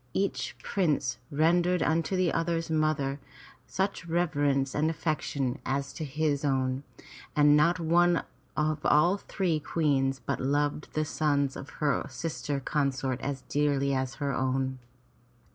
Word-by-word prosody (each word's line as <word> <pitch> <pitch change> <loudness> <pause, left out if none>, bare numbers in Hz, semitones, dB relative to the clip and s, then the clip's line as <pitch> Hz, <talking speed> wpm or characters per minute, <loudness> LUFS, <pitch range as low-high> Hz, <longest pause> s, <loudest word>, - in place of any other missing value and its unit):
Each 200 +1 -1
prince 145 -10 0
rendered 175 +4 +2
unto 165 +4 +1
the 185 -2 +2
other's 165 0 -1
mother 155 -3 +1 0.5
such 190 -2 -2
reverence 145 -5 +1
and 155 +2 +1
affection 150 -4 -2
as 140 +1 -2
to 160 - -5
his 150 0 -1
own, 130 -2 0 0.5
and 150 0 +6
not 170 +4 +4
one 175 +1 +3 0.3
of 155 0 0
all 170 +6 +4
three 180 -5 -1
Queens 140 -4 +1
but 120 - -3
loved 145 +2 0
the 155 0 0
sons 145 -3 0
of 140 - -8 0.2
her 140 - +1
sister 150 -3 -3
consorts 135 -2 -1
as 135 -2 -3
dearly 140 -1 +1
as 130 0 -1
her 140 -1 -2
own. 130 0 -1
150 Hz, 135 wpm, -29 LUFS, 135-165 Hz, 0.5 s, and